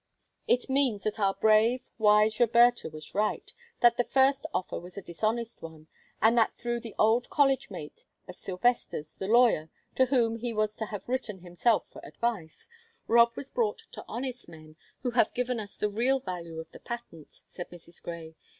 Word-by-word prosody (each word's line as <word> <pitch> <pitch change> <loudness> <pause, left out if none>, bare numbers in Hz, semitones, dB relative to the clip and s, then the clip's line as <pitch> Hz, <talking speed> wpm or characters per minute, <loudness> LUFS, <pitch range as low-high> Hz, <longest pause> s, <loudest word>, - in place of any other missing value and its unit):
"It 245 +1 +2
means 265 -7 +1
that 215 0 -2
our 195 -2 +2
brave, 225 +4 +3
wise 210 0 +4
Roberta 240 -1 +4
was 155 0 -9
right; 210 +1 -1 0.3
that 240 -1 +5
the 245 - +3
first 270 +2 +2
offer 185 - -3
was 180 +2 -12
a - - -4
dishonest 220 +7 -2
one, 160 -1 -11 0.3
and 225 +2 +4
that 230 -2 +3
through 240 0 -3
the 230 -2 -9
old 225 +3 +3
college 275 -2 +2
mate 155 -7 -9 0.2
of 180 - -9
Sylvester's, 185 -6 -1
the 190 - -6
lawyer, 225 -9 +4 0.2
to 260 - +4
whom 235 -3 +2
he 235 0 -3
was 215 0 0
to 220 - -3
have 205 -2 -7
written 240 -7 -3
himself 180 +6 +1
for 315 - -13
advice, 235 - -4 0.4
Rob 235 0 +5
was 275 - -8
brought 220 -4 -1
to - - -9
honest 250 -2 -5
men, 155 -1 -14 0.3
who 250 - 0
have 235 -3 +2
given 250 -1 -1
us 205 -2 -7
the 210 - 0
real 250 +6 +2
value 170 -7 -6
of 160 0 -9
the - - -12
patent," 235 -10 -9
said 175 - -8
Mrs. 175 -1 -14
Grey. 165 -2 -7
220 Hz, 185 wpm, -29 LUFS, 180-240 Hz, 0.4 s, that